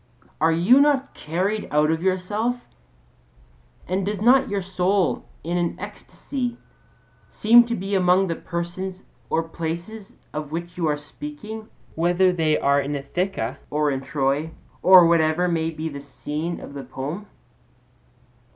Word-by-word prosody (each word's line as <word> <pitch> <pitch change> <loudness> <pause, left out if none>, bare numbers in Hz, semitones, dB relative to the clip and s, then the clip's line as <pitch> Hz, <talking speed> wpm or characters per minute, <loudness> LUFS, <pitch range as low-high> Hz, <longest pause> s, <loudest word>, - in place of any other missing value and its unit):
Are 160 +1 +4
you 180 +11 +5
not 285 -2 +2
carried 190 +7 -2
out 150 +1 +3
of 160 0 -1
yourself, 205 +7 -1 1.2
and 185 +2 0
does 205 +1 -2
not 255 +4 +5
your 200 -2 -1
soul 185 0 0 0.2
in 175 +2 -1
an 170 -1 -2
ecstasy 245 -4 -5 0.7
seem 235 +2 +6
to 235 - -1
be 195 0 -4
among 185 0 +4
the 170 -3 -2
persons 180 +2 -5 0.3
or 165 - +1
places 170 +6 -6 0.2
of 150 -1 -5
which 170 +2 -5
you 170 -2 0
are 150 -1 +1
speaking, 220 - -8 0.3
whether 175 +3 +3
they 160 -3 +2
are 140 +1 +3
in 140 +1 -3
Ithaca 140 - -3
or 150 0 +1
in 135 -1 -2
Troy 140 +2 -1 0.3
or 185 -2 +8
whatever 165 +1 +3
may 165 -2 0
be 160 0 -5
the 140 -3 -6
scene 150 +4 -5
of - - -10
the 140 - -6
poem? 140 +10 -6
175 Hz, 145 wpm, -23 LUFS, 155-200 Hz, 1.2 s, or